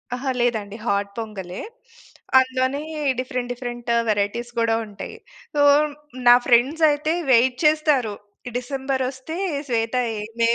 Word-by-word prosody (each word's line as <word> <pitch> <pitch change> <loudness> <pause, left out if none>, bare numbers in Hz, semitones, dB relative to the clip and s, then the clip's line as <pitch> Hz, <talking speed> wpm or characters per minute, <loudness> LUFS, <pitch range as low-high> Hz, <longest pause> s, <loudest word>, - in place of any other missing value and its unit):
అహా 265 +1 -2
లేదండి. 215 -3 -1
హాట్ 200 -1 0
పొంగ‌లే. 195 -5 -6 0.8
అందులోని 260 +2 0 0.4
డిఫరెంట్, 250 -1 -3
డిఫరెంట్ 240 -1 -7 0.2
వేరైటీస్ 215 +4 -1
కూడా 230 -1 +2
ఉంటయి. 200 -2 -9 0.4
సో 290 - +3 0.7
నా 240 - +10
ఫ్రెండ్స్ 265 +7 +3
అయితే 305 +2 0 0.2
వెయిట్ 250 +1 +4
చేస్తారు. 300 -8 +3 0.4
డిసెంబర్ 265 +1 -2
వస్తే 265 +5 -8 0.3
శ్వేత 230 +1 0 0.3
ఏందే 230 +2 0
245 Hz, 115 wpm, -22 LUFS, 225-265 Hz, 0.8 s, నా